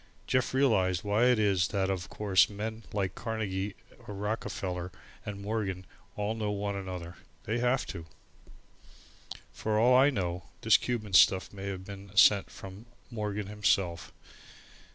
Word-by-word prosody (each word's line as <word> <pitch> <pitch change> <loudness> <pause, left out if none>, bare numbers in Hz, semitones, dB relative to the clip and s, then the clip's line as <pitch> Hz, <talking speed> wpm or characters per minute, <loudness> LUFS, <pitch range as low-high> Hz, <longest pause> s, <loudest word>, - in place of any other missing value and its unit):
Jeff 130 -1 +1
realized 95 -10 +2
why 105 +3 +2
it 125 -1 +4
is 100 -4 +2
that 95 -1 0
of 90 -2 -4
course 100 -3 +3
men 110 +2 -5
like 95 -3 -1
Carnegie 100 -3 -3 0.3
or 105 - -6
Rockefeller 95 -3 -3 0.4
and 100 -1 -5
Morgan 100 -4 -3 0.3
all 105 +1 -1
know 110 -2 -2
one 100 0 -2
another. 90 -3 -6 0.3
They 115 +3 -1
have 125 +2 +1
to. 85 -3 -7 1.5
For 110 -1 -1
all 125 +3 +5
I 135 +3 +6
know, 90 -8 -3 0.2
this - - +6
Cuban 110 -5 -4
stuff 95 +2 +5
may 100 -1 -6
have 95 -1 -5
been 100 0 -10
sent 100 +1 +6
from 95 +4 -11 0.2
Morgan 105 -2 -3
himself. 95 -4 0
100 Hz, 145 wpm, -30 LUFS, 95-110 Hz, 1.5 s, I